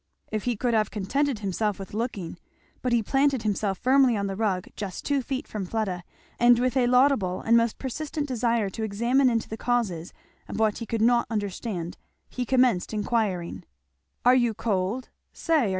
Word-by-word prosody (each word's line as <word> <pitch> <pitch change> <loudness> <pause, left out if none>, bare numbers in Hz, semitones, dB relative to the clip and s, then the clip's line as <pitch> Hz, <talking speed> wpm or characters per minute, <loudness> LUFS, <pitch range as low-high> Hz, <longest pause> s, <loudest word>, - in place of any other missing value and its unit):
If 215 -1 -2
he 245 -1 +1
could 240 +3 0
have 215 -2 +2
contented 270 +6 -1
himself 205 0 -1
with 195 -1 -9
looking! 205 -6 -4 0.4
but 250 - -1
he 235 -2 +3
planted 270 0 +2
himself 205 -2 0
firmly 260 -1 +4
on 200 - -1
the 195 -1 -3
rug 195 -4 -1
just 195 -3 -6
two 285 -2 +1
feet 265 +3 -4
from 210 -2 -4
Fleda, 190 -4 -2 0.4
and 240 0 +6
with 255 +1 0
a 250 -2 +3
laudable 250 -8 +3
and 230 - +3
most 230 -1 +2
persistent 295 +3 -4
desire 235 -5 0
to 225 - -6
examine 235 +6 +2
into 230 -2 0
the 220 - -6
causes 220 -9 -1 0.4
of - - -6
what 220 -2 +2
he 230 - -6
could 225 -2 0
not 240 0 +4
understand 205 -4 -4 0.3
he 250 -1 -4
commenced 250 -6 +2
inquiring, 195 - -1 0.6
"Are 250 - +7
you 240 -3 +2
cold? 225 +2 -1 0.2
say! 310 - +1
225 Hz, 180 wpm, -26 LUFS, 200-250 Hz, 0.6 s, Are